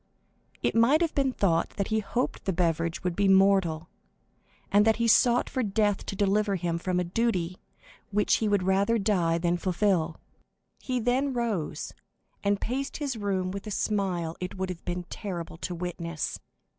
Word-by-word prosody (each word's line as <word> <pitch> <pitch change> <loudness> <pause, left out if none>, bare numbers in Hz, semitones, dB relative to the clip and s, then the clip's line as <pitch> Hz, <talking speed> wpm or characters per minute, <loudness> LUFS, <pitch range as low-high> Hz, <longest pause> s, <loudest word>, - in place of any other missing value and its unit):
It - - +1
might 240 +8 +4
have 335 -2 +1
been 270 -2 +1
thought 175 -9 0
that 200 - -1
he 220 0 +2
hoped 240 +4 -2
the 190 - 0
beverage 170 -1 0
would 180 -2 -1
be 200 +1 +2
mortal, 190 -4 +4 0.8
and 205 +1 +6
that 220 0 +4
he 235 0 0
sought 240 +2 +4
for 260 - -2
death 205 -2 0
to - - -3
deliver 205 +1 +2
him 170 -2 -2
from 180 +1 -1
a - - +1
duty 180 -2 -1 0.5
which 205 0 +2
he 220 - 0
would 205 -2 +2
rather 195 +5 +2
die 180 -6 +1
than 175 +1 +1
fulfil. 175 -3 0 0.6
He 255 -1 -2
then 255 +4 +1
rose, 225 -10 -2 0.5
and 200 0 +1
paced 270 +4 -3
his 285 -4 -3
room 195 -4 -1
with 200 +2 -6
a - - -3
smile 190 -6 -1
it 180 +1 -5
would 190 0 -2
have 180 -2 -6
been 180 0 -3
terrible 175 -6 -5
to 175 +1 -4
witness. 170 -2 -4
195 Hz, 175 wpm, -27 LUFS, 175-220 Hz, 0.8 s, and